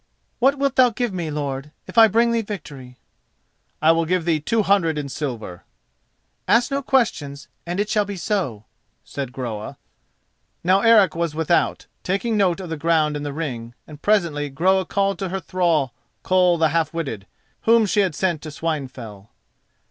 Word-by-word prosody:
"What 270 +3 +3
wilt 275 -1 0
thou 255 -1 +7
give 235 -1 -3
me, 170 -4 -3
lord, 145 -1 -4
if - - -11
I 225 -1 +8
bring 230 +3 +2
thee 230 -1 +1
victory?" 145 - -8 0.9
"I 160 - +7
will 165 0 +1
give 180 0 0
thee 165 -3 +2
two 220 +9 0
hundred 185 -6 +2
in 145 -2 -4
silver." 120 - -5 0.8
"Ask 240 +4 +3
no 275 0 0
questions 165 - -1 0.2
and 175 +3 -3
it 205 - +1
shall 210 -1 +1
be 200 0 -5
so," 165 - -2 0.4
said 135 -3 -6
Groa. 115 -5 -6 0.9
Now 185 +3 +3
Eric 215 -7 +5
was 170 -2 -2
without, 160 +1 +1 0.2
taking 200 +5 -1
note 195 -4 +2
of 185 -3 -7
the 160 - -3
ground 155 -1 +1
in 145 - -4
the 145 0 -4
ring, 120 -6 -5
and 150 -1 -13
presently 170 -9 +1
Groa 185 +7 +2
called 195 0 0
to 195 -2 -3
her 190 +2 -2
the - - -19
thrall 165 -8 +1 0.3
Koll 180 -2 +3
the 160 -1 +3
Half 165 +1 0
witted, 125 -12 -4 0.4
whom 230 0 +5
she 205 +1 0
had 190 -6 +1
sent 175 -4 0
to 155 - -7
Swinefell. 130 -10 -5
165 Hz, 180 wpm, -22 LUFS, 145-200 Hz, 0.9 s, I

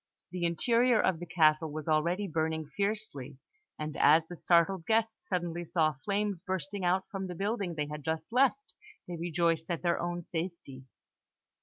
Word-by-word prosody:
The 180 -1 -2
interior 230 +7 +3
of 180 -4 +2
the 175 - -7
castle 155 -1 +3
was 155 0 -6
already 170 +6 +1
burning 160 -1 -1
fiercely; 200 - -2 0.4
and 155 -1 -5
as 160 +2 +5
the 175 - -8
startled 170 +1 +2
guests 225 0 0
suddenly 175 -2 -2
saw 160 -2 +1
flames 200 -3 -1
bursting 190 +1 -4
out 180 +2 +2
from 195 -1 -4
the 180 - -6
building 200 -2 -2
they 150 -1 -1
had 150 0 -7
just 160 +1 -2
left, 270 - +2 0.3
they 175 - -5
rejoiced 165 -1 0
at 170 0 -2
their 170 -1 +1
own 175 0 -3
safety. 165 -6 -6
175 Hz, 165 wpm, -30 LUFS, 160-195 Hz, 0.4 s, as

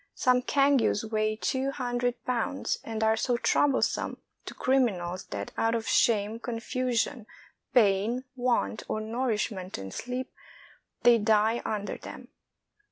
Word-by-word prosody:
Some 250 -1 +3
cangues 275 -5 +2
weigh 215 0 0
two 265 +4 -1
hundred 245 -2 -2
pounds, 250 +2 -1
and 220 -1 -3
are 220 0 +4
so 240 +2 0
troublesome 275 +2 +1 0.3
to - - -7
criminals 195 -9 0
that - - -6
out 225 +1 +2
of 225 -2 -3
shame, 215 0 +2
confusion, 240 0 -2 0.5
pain, 220 +2 +3
want 240 - 0
of 215 - -2
nourishment 220 -5 -2
and 95 -1 -7
sleep, 250 +1 -5 0.7
they 240 -1 +6
die 220 +2 +3
under 205 -1 -3
them. - - -10
230 Hz, 125 wpm, -28 LUFS, 215-250 Hz, 0.7 s, they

